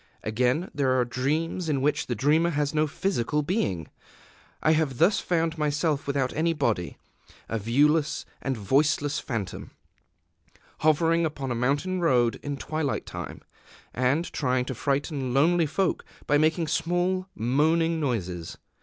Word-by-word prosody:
Again, 125 - 0
there 130 -3 +2
are 125 - +2
dreams 155 +8 -1
in 140 -3 +1
which 145 +3 0
the 120 - -1
dreamer 155 +8 +3
has 145 -2 -1
no 155 0 +2
physical 150 -3 -1
being. 120 - -1 0.8
I 155 - +4
have 155 -5 +1
thus 185 - +4
found 165 -2 -1
myself 150 0 0
without 135 -2 0
any 165 +2 +1
body, 115 - -1 0.5
a 115 - -2
viewless 150 +8 +2 0.2
and 135 -2 -2
voiceless 145 +7 +1
phantom, 110 -7 -5 1.1
hovering 165 +2 +3
upon 140 -5 -3
a - - +1
mountain 145 +10 0
road 125 -8 +2
in 145 -1 -4
twilight 155 -1 -2
time, - - -7 0.5
and 130 +7 0
trying 125 -3 0
to 130 - -4
frighten 135 0 -1
lonely 165 +3 +4
folk 180 +4 0 0.2
by 145 0 +3
making 160 +2 +2
small 175 +4 0
moaning 160 +8 +2
noises. 95 - -3
145 Hz, 140 wpm, -26 LUFS, 130-165 Hz, 1.1 s, I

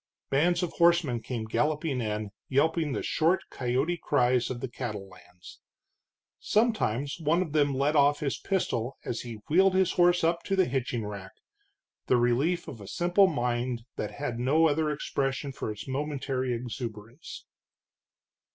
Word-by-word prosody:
Bands 175 +6 +2
of 175 - -2
horsemen 170 -8 +3
came 115 -3 -4
galloping 150 +2 0
in, 105 -2 -3 0.2
yelping 155 +3 +2
the - - -3
short, 170 +4 +1
coyote 135 +7 -1
cries 125 -3 +2
of 125 - -4
the 130 - -3
cattle 110 -5 -5
lands. 90 -1 -15 0.8
Sometimes 170 - 0
one 165 +3 +2
of 160 - -8
them 145 -3 +2
let 140 +3 +1
off 145 0 +4
his 145 -4 -2
pistol 135 - -1
as 120 - -3
he 115 -3 -8
wheeled 190 +4 +4
his 190 -1 +3
horse 175 -1 +3
up 170 +1 +2
to 195 - 0
the 190 -1 +4
hitching 125 -4 -2
rack, 100 -2 -7 0.7
the 125 - +4
relief 130 +9 +1
of 115 - -8
a 100 - -10
simple 175 - +3
mind 120 -5 -1
that - - -3
had 125 -5 -4
no 150 +6 +4
other 155 +1 +1
expression 140 -2 -2
for 130 - -4
its 105 0 -8
momentary 135 -2 -2
exuberance. 115 +1 -6
135 Hz, 155 wpm, -28 LUFS, 120-160 Hz, 0.8 s, off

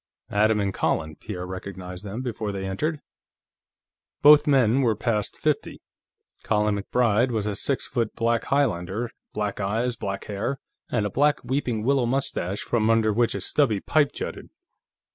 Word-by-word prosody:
"Adam 105 +1 +3
and 100 -1 -1
Colin," 80 -1 -1
Pierre 90 0 -6
recognized 90 0 -7
them 105 +5 -5
before 110 -4 -3
they 95 -1 -4
entered. 150 +11 -2 1.2
Both 150 +1 +8
men 130 -3 +4
were 115 -4 +2
past 105 -2 -1
fifty. - - -1 0.6
Colin 105 -1 +1
MacBride 115 +3 +2
was 110 -4 -1
a 105 - -1
six 135 +6 0
foot 115 -3 -2
black 115 0 +1
Highlander; 115 -4 0 0.2
black 105 -2 -2
eyes, 115 +5 -1
black 100 -3 -4
hair, 105 +7 -3 0.3
and 110 -4 0
a 105 - -2
black 145 +5 +2
weeping 125 -5 -1
willow 135 -1 +2
mustache, 115 -7 -1
from 110 -2 +1
under 110 -1 +3
which 120 0 +2
a 100 - -3
stubby 110 -1 +2
pipe 145 +6 +2
jutted. - - -6
110 Hz, 155 wpm, -25 LUFS, 100-125 Hz, 1.2 s, Both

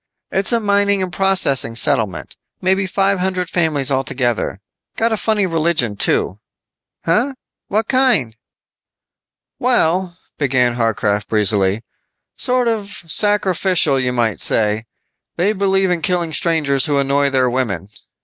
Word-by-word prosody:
"It's 195 +4 +1
a 235 - +2
mining 200 -2 +1
and 180 -1 -5
processing 180 -12 +1
settlement. 115 - 0 0.2
Maybe 190 +1 0
five 195 0 0
hundred 185 -1 -2
families 150 -5 0
altogether. 125 -6 -1 0.4
Got 230 +1 +1
a - - +2
funny 215 -1 0
religion, 165 - 0
too." 95 -1 0 0.7
"Huh, 250 +11 +1 0.3
what 215 +2 -1
kind?" 250 - +2 1.2
"Well," 175 +2 0 0.2
began 130 -4 +1
Harcraft 110 -3 -1
breezily, 105 0 +1 0.5
"sort 250 -1 +2
of 210 -5 -3
sacrificial 185 -5 +2
you 125 -1 0
might 115 -4 -1
say. 110 +1 +1 0.5
They 195 +5 +1
believe 195 -2 +1
in 175 -2 -1
killing 170 0 -1
strangers 145 -6 +2
who 145 -2 0
annoy 140 +1 +1
their 130 -2 +1
women." 115 -7 -2
165 Hz, 125 wpm, -17 LUFS, 125-195 Hz, 1.2 s, a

